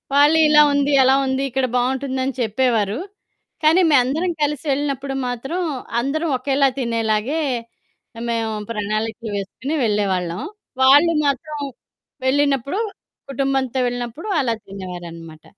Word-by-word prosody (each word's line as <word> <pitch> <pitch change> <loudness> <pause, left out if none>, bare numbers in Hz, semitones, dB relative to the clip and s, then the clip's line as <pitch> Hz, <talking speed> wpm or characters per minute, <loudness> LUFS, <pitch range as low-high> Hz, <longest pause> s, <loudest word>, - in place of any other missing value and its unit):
వాళ్ళీలా 300 +1 +6
ఉంది 285 0 +2
ఎలా 265 +1 +5
ఉంది? 265 +1 -1
ఇక్కడ 265 +1 0
బావుంటుందని 260 +1 0
చెప్పేవారు. 225 -1 +1 0.6
కానీ 320 +4 +5
మేమందరం 290 +6 +2
కలిసి 295 0 -1
వెళ్ళినప్పుడు 275 -1 -2
మాత్రం 270 +8 -3 0.4
అందరం 310 +6 -1
ఒకేలా 275 +1 +2
తినేలాగే, 230 +4 0 0.9
మేము 225 -1 -1 0.2
ప్రణాళికలు 215 +1 -3
వేసుకొని 230 +9 -4
వెళ్ళేవాళ్ళం. 190 -4 0 0.4
వాళ్ళు 290 +6 +6
మాత్రం 300 +2 -2 0.7
వెళ్ళినప్పుడు. 280 - +1 0.5
కుటుంబంతో 270 -1 0
వెళ్ళినప్పుడు 245 - -5
అలా 240 -4 0
తినేవారనమాట. 175 -4 -9
260 Hz, 100 wpm, -21 LUFS, 225-285 Hz, 0.9 s, వాళ్ళీలా